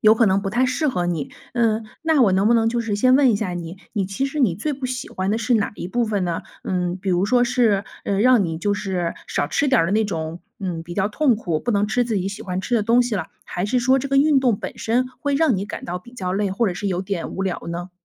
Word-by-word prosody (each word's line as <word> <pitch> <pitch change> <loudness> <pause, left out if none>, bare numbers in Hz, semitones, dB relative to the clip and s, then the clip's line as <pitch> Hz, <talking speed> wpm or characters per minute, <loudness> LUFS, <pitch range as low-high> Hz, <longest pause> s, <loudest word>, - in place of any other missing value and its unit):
有 215 +1 +6
可 230 - +3
能 195 -1 +3
不 195 - -3
太 245 +5 +2
适 255 +5 0
合 180 -9 -1
你。 165 -5 -2 0.2
嗯， 225 -2 +1 0.2
那 320 -4 +3
我 200 -5 +4
能 195 +3 +3
不 235 - +5
能 225 -1 +3
就 240 0 0
是 225 -3 -2
先 255 +4 +4
问 275 -2 +5
一 215 - +2
下 190 - -2
你， 175 0 -6 0.2
你 200 -4 -1
其 195 +8 -2
实 275 +2 -2
你 220 -10 +3
最 295 - -2
不 265 -1 -4
喜 250 0 -5
欢 190 +1 -2
的 215 - +1
是 230 +2 -1
哪 215 -4 +2
一 - - -6
部 240 +4 0
分 205 -3 0
呢？ 170 -2 -2 0.2
嗯， 180 -1 -1
比 190 +1 -3
如 180 +2 +2
说 245 +2 +4
是， 235 -5 +2 0.2
呃， 195 - 0
让 250 -1 +5
你 165 -3 -2
就 205 +5 0
是 185 -4 -2
少 - - -1
吃 280 - +1
点 260 - +4
儿 - - +1
的 180 - -1
那 220 +1 +3
种， 165 -2 -4 0.2
嗯， 175 -4 -4
比 175 +1 -8
较 190 0 +1
痛 250 +2 +2
苦 170 -8 -2
不 245 - -2
能 205 -2 +2
吃 245 +4 +1
自 235 -2 -2
己 190 0 -1
喜 200 +1 -7
欢 185 0 -3
吃 245 - -1
的 225 - +3
东 235 +3 +4
西 240 -2 -2
了， 180 -5 -2 0.2
还 180 +2 -3
是 250 +4 +1
说 260 +2 +3
这 275 +1 -4
个 275 - +1
运 285 0 +5
动 240 -6 +2
本 - - -7
身 245 +3 +1
会 285 -1 0
让 300 -3 +3
你 195 +1 -2
感 - - -7
到 180 +1 -4
比 240 +7 -16
较 185 -6 -3
累， 200 +1 0
或 210 +5 +1
者 190 - 0
是 175 +3 -4
有 185 -2 -1
点 190 -3 -3
无 190 - -4
聊 190 -2 -2
呢？ 175 +2 -5
210 Hz, 315 characters per minute, -22 LUFS, 185-245 Hz, 0.2 s, 有